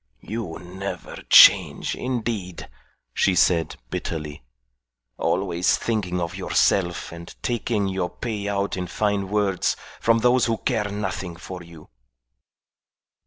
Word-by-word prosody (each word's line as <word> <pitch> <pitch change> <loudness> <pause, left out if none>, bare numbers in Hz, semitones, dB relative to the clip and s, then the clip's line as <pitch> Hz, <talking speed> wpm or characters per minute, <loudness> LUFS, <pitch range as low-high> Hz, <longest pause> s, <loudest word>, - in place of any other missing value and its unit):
"You 110 -7 -5
never 95 +3 -7
change, - - +7
indeed," 115 -8 -4 0.5
she 95 - +2
said, 85 -2 +2 0.2
bitterly. 75 -3 -4 0.8
"Always 90 -1 +1
thinking 100 -6 -1
of 85 -1 -3
yourself 90 -3 +1
and 85 0 -9
taking 115 -4 0
your 95 -2 -2
pay 105 -4 -4
out 100 0 -1
in 90 -1 -4
fine 100 0 -1
words 100 -3 +1 0.2
from 115 0 +3
those 125 +2 +3
who 115 -1 0
care 110 -5 -1
nothing 95 -3 -4
for 90 +2 -8
you." 85 -2 -14
95 Hz, 120 wpm, -24 LUFS, 90-110 Hz, 0.8 s, change